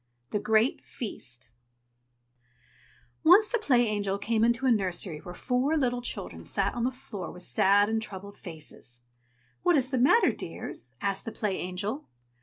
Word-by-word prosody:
THE 210 - 0
GREAT 220 +4 +2
FEAST 125 - -6 1.7
Once 375 +7 +7
the 485 - +1
Play 250 - +3
Angel 205 -2 -1
came 220 +2 0
into 235 +3 +2
a 260 - +5
nursery 185 -6 0
where 175 +3 -9
four 260 - +1
little 245 -4 +1
children - - -5
sat - - -1
on 240 - -2
the - - +3
floor 215 -7 -7
with 180 - -7
sad 200 +10 +4
and 220 0 0
troubled 200 -1 -7
faces. 150 -7 -8 0.6
"What 350 -3 +4
is 265 -1 +1
the 260 - +1
matter, 285 - +5
dears?" - - -6
asked 200 -1 -1
the 225 - -4
Play 210 -3 -1
Angel. 200 +10 -4
215 Hz, 160 wpm, -28 LUFS, 190-250 Hz, 1.7 s, Once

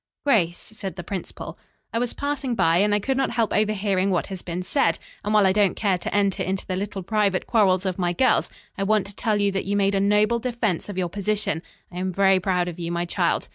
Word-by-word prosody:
"Grace," 180 -11 +3
said 210 -3 -7
the 175 - -6
principal, 185 +1 -6 0.3
"I 230 - +1
was 245 0 -2
passing 285 -3 -2
by 170 -5 +3
and 205 +2 +3
I - - +2
could 265 +6 -1
not 270 - +1
help 230 -2 0
overhearing 200 -2 +1
what 180 -3 +1
has 185 - -6
been 180 +1 -4
said, 165 -2 +1 0.3
and 210 - -2
while 210 -2 +5
I 190 - +5
don't 205 -2 +2
care 195 -4 +1
to - - -4
enter 200 -1 +1
into 190 +1 -2
the 185 - -3
little 195 0 -4
private 200 -2 +1
quarrels 195 -4 +3
of 185 0 -2
my 175 -1 +1
girls, 255 +9 +2 0.3
I - - +1
want 215 0 +2
to 200 - -9
tell 220 -3 0
you 200 0 +2
that 195 0 -2
you 200 +1 -1
made 200 0 +2
a 195 - +2
noble 210 +3 +3
defense 230 -7 -2
of 200 - -6
your 180 -2 0
position. 200 -3 -1 0.3
I 180 - -6
am 185 0 -1
very 195 0 +4
proud 180 -1 0
of 175 -1 -6
you, 170 0 -3
my 170 0 -1
child." 175 - 0
195 Hz, 245 wpm, -24 LUFS, 185-215 Hz, 0.3 s, while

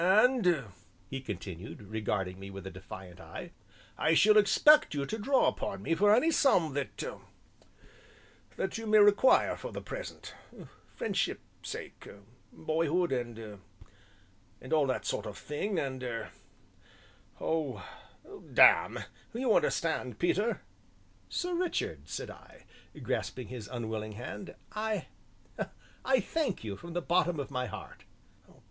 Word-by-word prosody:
"And," 190 - +4 0.5
he 135 0 -3
continued, 100 -2 -7
regarding 95 -3 -2
me 95 0 -8
with 100 0 -8
a 95 - -5
defiant 95 -1 -10
eye, - - -8 0.5
"I 160 +2 +4
shall 215 +5 +6
expect 215 - +6
you 140 -1 0
to 220 - -3
draw 265 +6 +3
upon 195 -2 -2
me 165 - +1
for 205 +5 +5
any 315 +8 +3
sum 180 - +4
that 140 -1 -1 1.7
that 190 - -2
you 225 - -5
may 215 0 +6
require 205 +5 +6
for - - -7
the - - -5
present - - -7 0.6
friendship's 200 -3 -3
sake - - -7 0.4
boyhood 165 +2 0
and 115 -5 -4 1.0
and 130 - -5
all 150 -3 +4
that 130 - -1
sort - - -2
of - - -7
thing, 185 +7 -3
and 135 -4 -2
er 120 -2 -4 1.1
oh, 140 - -2 0.6
damme, - - +6 0.3
you 240 -2 +2
understand, 130 - +1
Peter?" 205 - +1 0.7
"Sir 360 -1 -2
Richard," 350 0 -2
said - - -4
I, - - -16 0.4
grasping 125 -4 -2
his 120 -5 -7
unwilling 110 -2 -4
hand, 125 - -7 0.2
"I 215 0 -2 1.0
I 265 -1 +4
thank 275 - -1
you 105 -3 -4
from 170 - -9
the 175 -1 -2
bottom 175 -2 +2
of 140 0 -4
my 125 -1 -1
heart." - - -9
160 Hz, 130 wpm, -31 LUFS, -, 1.7 s, shall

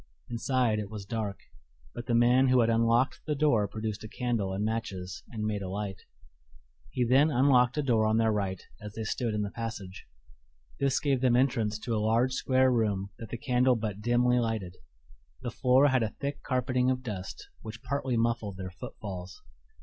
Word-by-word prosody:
Inside 120 -2 +1
it 105 -2 -5
was 105 -2 -7
dark, 105 -2 -4 0.5
but 120 - -7
the 120 - +2
man 125 +3 +5
who 130 -1 +5
had 115 0 +3
unlocked 115 +3 +2
the 150 - 0
door 140 -8 +3
produced 110 +1 -5
a - - -6
candle 115 -5 -2
and 100 +2 -1
matches 100 -5 -4
and 110 -3 -5
made 105 -1 -1
a 95 - -4
light. 100 -1 -4 0.9
He 125 - 0
then 135 +6 +5
unlocked 125 -1 +4
a 150 - +1
door 115 -5 +2
on 110 +1 +2
their 115 -1 +3
right 100 -3 -2 0.2
as 105 0 -8
they 110 - -4
stood 110 +1 -2
in 105 - 0
the 100 - -4
passage. 105 -5 -6 0.7
This 140 -1 +2
gave 135 -3 +1
them 125 -2 +3
entrance 115 -5 +1
to 115 +2 -4
a 105 - 0
large, 115 +4 +2
square 130 0 +3
room 100 -4 0
that 115 - -8
the 120 - -4
candle 125 +1 +2
but 105 -3 -4
dimly 120 +2 +3
lighted. 110 -6 -2 0.7
The 120 - -3
floor 130 +4 +4
had 130 -2 +2
a 110 - 0
thick 140 +6 -5
carpeting 125 0 0
of 130 0 -1
dust, 100 -6 -6
which 110 +3 -9
partly 130 -2 -1
muffled 115 -4 -1
their 95 -1 -6
footfalls. 95 -3 -8
115 Hz, 190 wpm, -29 LUFS, 105-125 Hz, 0.9 s, man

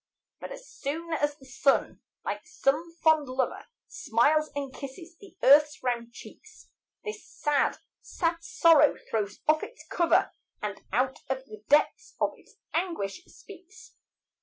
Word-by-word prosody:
But - - -8
as - - -9
soon 320 +4 -4
as 290 -1 0
the 265 - -17
sun, 265 +2 +1 0.2
like - - -4
some 325 +5 0
fond 315 -3 +4
lover, 260 0 -2 0.2
Smiles 305 - +2
and 280 -2 -4
kisses 305 +6 -9
the 380 -1 -16
earth's 295 +2 +6
round 235 -2 -1
cheeks, - - -14 0.3
This 425 0 -6
sad, 295 -1 0 0.2
sad 335 -1 -1
sorrow 335 -9 +5
throws 205 -2 -2
off 310 0 +4
its 485 - -9
cover, 340 -1 +2 0.3
And 205 -1 -5
out 255 +5 +1
of 265 0 -2
the 215 -4 -12
depths 300 +10 +2
of - - +2
its - - -22 0.2
anguish, 325 - -2
speaks. 405 +4 -15
295 Hz, 140 wpm, -28 LUFS, 260-340 Hz, 0.3 s, earth's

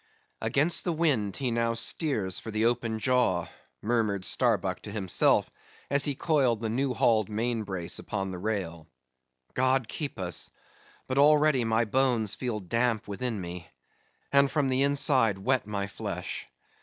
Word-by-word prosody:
"Against 155 +5 +2
the 175 - -1
wind 135 - +1
he 130 -3 -2
now 115 0 0
steers 115 - 0
for - - -8
the 110 +1 0
open 115 -1 0
jaw," 110 -8 +1 0.4
murmured 105 -4 0
Starbuck - - +1
to - - -8
himself, 100 -4 +2 0.4
as 140 0 +4
he 145 - 0
coiled 135 -7 +1
the 110 -1 -3
new 130 +2 -1
hauled 110 -3 +2
main 115 +2 -1
brace 95 -5 -3
upon 95 -2 -4
the 90 - -6
rail. 90 -6 -4 0.7
"God 130 -1 +1
keep 145 +2 -5
us, 90 -3 -2 0.6
but 130 +1 -1
already 150 -2 +4
my 115 +1 +2
bones 120 -3 +1
feel 120 -4 -3
damp 115 +3 0
within 110 +2 -3
me, 85 -2 -7 0.6
and 140 0 +4
from 145 -3 0
the 130 +1 +1
inside 135 - +3
wet 125 +3 0
my 100 -1 -2
flesh. 100 - -6
115 Hz, 155 wpm, -28 LUFS, 100-135 Hz, 0.7 s, as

